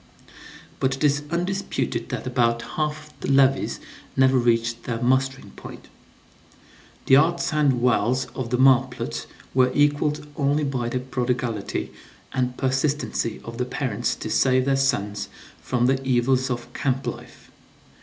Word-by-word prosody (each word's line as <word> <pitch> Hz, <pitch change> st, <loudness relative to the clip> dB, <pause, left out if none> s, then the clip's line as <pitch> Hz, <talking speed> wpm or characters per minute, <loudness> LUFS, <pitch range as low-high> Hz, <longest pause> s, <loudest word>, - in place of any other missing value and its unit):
But 135 Hz, +1 st, +1 dB
it 135 Hz, -, -6 dB
is 145 Hz, 0 st, +3 dB
undisputed 180 Hz, +4 st, -2 dB
that -, -, -4 dB
about 120 Hz, -2 st, +1 dB
half 150 Hz, 0 st, -3 dB
the -, -, -4 dB
levies 135 Hz, 0 st, +3 dB, 0.4 s
never 130 Hz, 0 st, +5 dB
reached 115 Hz, -1 st, +1 dB
their 115 Hz, -2 st, -2 dB
mustering 130 Hz, +2 st, 0 dB
point. -, -, -11 dB, 1.2 s
The 135 Hz, -, +6 dB
arts 165 Hz, +2 st, +2 dB
and 140 Hz, -5 st, +2 dB
wiles 125 Hz, +1 st, +2 dB
of 130 Hz, -3 st, -4 dB
the 125 Hz, -, +1 dB
marplots 130 Hz, -, +2 dB, 0.3 s
were 130 Hz, -1 st, +4 dB
equaled 145 Hz, +1 st, +2 dB
only 145 Hz, +1 st, +1 dB
by 130 Hz, -4 st, -1 dB
the 125 Hz, -, -1 dB
prodigality 125 Hz, -4 st, -2 dB, 0.4 s
and 125 Hz, -1 st, -1 dB
persistency 135 Hz, -3 st, -1 dB
of 115 Hz, +1 st, -8 dB
the 125 Hz, -, 0 dB
parents 125 Hz, -4 st, -2 dB
to -, -, -6 dB
save 130 Hz, -1 st, +3 dB
their 135 Hz, 0 st, +2 dB
sons 105 Hz, -7 st, 0 dB, 0.3 s
from 125 Hz, -1 st, 0 dB
"the 135 Hz, +1 st, +1 dB
evils 130 Hz, 0 st, +2 dB
of 120 Hz, 0 st, -5 dB
camp 130 Hz, +2 st, -1 dB
life." -, -, -8 dB
130 Hz, 140 wpm, -24 LUFS, 120-140 Hz, 1.2 s, The